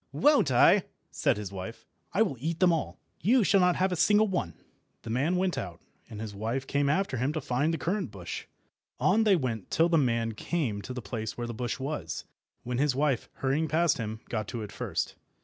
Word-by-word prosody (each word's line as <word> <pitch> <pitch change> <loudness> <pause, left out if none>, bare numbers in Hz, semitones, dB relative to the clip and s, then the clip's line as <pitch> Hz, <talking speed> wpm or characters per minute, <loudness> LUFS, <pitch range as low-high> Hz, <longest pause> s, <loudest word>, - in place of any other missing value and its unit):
"Won't 290 - +4
I?" 120 -2 +5 0.3
said - - +1
his 105 -2 -5
wife. 100 +4 -7 0.3
"I 215 - +4
will 185 -11 -2
eat 160 +5 -2
them 180 -2 +5
all. 165 - -2 0.2
You 235 +7 +4
shall 195 - +4
not 180 -1 +4
have 190 0 +1
a - - +1
single 210 +5 +4
one." 175 - -2 0.5
The 115 - -5
man 140 +9 +1
went 185 0 0
out, 85 -3 -6 0.3
and 105 - -8
his 110 -2 -5
wife 115 +6 -2
came 140 +1 +1
after 185 -3 +1
him 130 +4 0
to 155 - -1
find 135 +3 0
the 165 - -1
currant 185 +8 -1
bush. - - -6 0.5
On 220 +4 +3
they 205 -3 +6
went 120 - -2
till 165 +1 +3
the 165 -2 +4
man 115 -4 +1
came 115 -2 -2
to 130 - -6
the 125 - -5
place 110 0 -4
where 120 - -3
the 120 - -5
bush 120 +1 -3
was, 85 - -4 0.4
when 125 0 -2
his 140 -2 +2
wife, 140 -3 0
hurrying 140 +4 0
past 160 0 +2
him, 110 0 -4
got 110 -3 -3
to 115 -2 -4
it 105 - -8
first. - - -3
135 Hz, 220 wpm, -29 LUFS, 115-170 Hz, 0.5 s, they